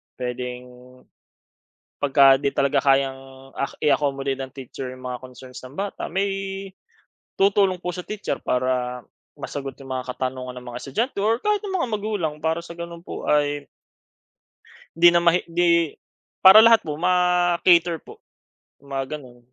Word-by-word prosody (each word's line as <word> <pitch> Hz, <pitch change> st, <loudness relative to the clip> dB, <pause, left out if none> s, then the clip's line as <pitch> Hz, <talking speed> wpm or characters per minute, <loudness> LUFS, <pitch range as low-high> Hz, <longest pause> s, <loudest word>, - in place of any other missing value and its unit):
puwedeng 125 Hz, 0 st, -5 dB, 1.3 s
pagka 135 Hz, -1 st, +5 dB
'di 140 Hz, -1 st, -2 dB
talaga 140 Hz, -1 st, +2 dB
kayang, 135 Hz, 0 st, -1 dB
ah, 140 Hz, -, -2 dB, 0.2 s
i-accommodate 140 Hz, -2 st, +1 dB
ng 130 Hz, -1 st, -6 dB
teacher 130 Hz, 0 st, -7 dB
'yong 130 Hz, -, -14 dB
mga 125 Hz, -1 st, -5 dB
concerns 130 Hz, 0 st, -11 dB
ng 130 Hz, +3 st, -12 dB
bata, 200 Hz, +1 st, -4 dB
may 195 Hz, 0 st, -3 dB, 0.6 s
tutulong 195 Hz, -1 st, +3 dB
po 180 Hz, 0 st, -5 dB
sa 180 Hz, 0 st, -7 dB
teacher 210 Hz, -1 st, -4 dB
para 125 Hz, 0 st, -1 dB, 0.4 s
masagot 140 Hz, -1 st, -5 dB
'yong 135 Hz, -, -11 dB
mga -, -, -19 dB
katanungan 130 Hz, 0 st, -4 dB
ng 125 Hz, -, -14 dB
mga -, -, -4 dB
estudyante 225 Hz, -, -2 dB
or 225 Hz, +2 st, +2 dB
kahit 420 Hz, +3 st, 0 dB
ng 395 Hz, -, -4 dB
mga 300 Hz, -, -1 dB
magulang, 205 Hz, -7 st, -2 dB
para 160 Hz, +1 st, 0 dB
sa 170 Hz, 0 st, -10 dB
gano'n 170 Hz, 0 st, -7 dB
po 170 Hz, -, -8 dB
ay 145 Hz, -1 st, +1 dB, 1.3 s
hindi 175 Hz, +1 st, +7 dB
na 175 Hz, 0 st, +4 dB
mah 170 Hz, -1 st, +5 dB
'di 170 Hz, -2 st, +2 dB, 0.5 s
para 190 Hz, +3 st, +11 dB
lahat 230 Hz, 0 st, +6 dB
po 150 Hz, -1 st, -5 dB
ma-cater 175 Hz, -1 st, +3 dB
po, -, -, -14 dB, 0.6 s
mga 135 Hz, 0 st, -4 dB
gano'n. 125 Hz, -4 st, -14 dB
150 Hz, 150 wpm, -23 LUFS, 135-180 Hz, 1.3 s, para